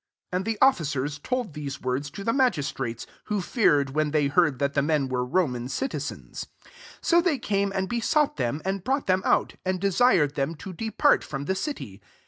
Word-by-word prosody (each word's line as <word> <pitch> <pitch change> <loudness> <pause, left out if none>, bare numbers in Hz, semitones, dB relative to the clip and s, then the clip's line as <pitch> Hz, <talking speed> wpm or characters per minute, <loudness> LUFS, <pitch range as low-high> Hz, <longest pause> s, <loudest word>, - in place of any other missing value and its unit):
i - - 0
And 190 - -3
the 225 -1 -1
officers 145 - +2
told 245 - -2
these 140 -2 -5
3rds 130 +3 -3
to 200 - -6
the 230 - +1
magistrates; 145 - 0 0.2
who 210 -1 -1 0.2
ared 145 - +4
when 155 +1 +1
they 150 -1 +2
heard 150 -1 +3
that? 140 +1 +1
men 150 -2 +1
were 125 -1 0
Roman 125 -4 0
citizens. 205 - -4 0.2
• - - -26 0.4
So 345 0 +4
they 335 -5 +1
came' 200 -4 0
and 190 0 0
besought 240 - +1
em, 130 +4 -1
and 190 -1 -2
brought 270 +4 0
them 185 -1 +2
out, - - +2
I 185 - -2
and 185 -1 0
desired 190 - +3
them 145 +3 -1
to 185 +4 -8
depart 225 - +2
from 135 +1 -5
the 190 - 0
city. 135 - -5
165 Hz, 195 wpm, -26 LUFS, 140-215 Hz, 0.4 s, ared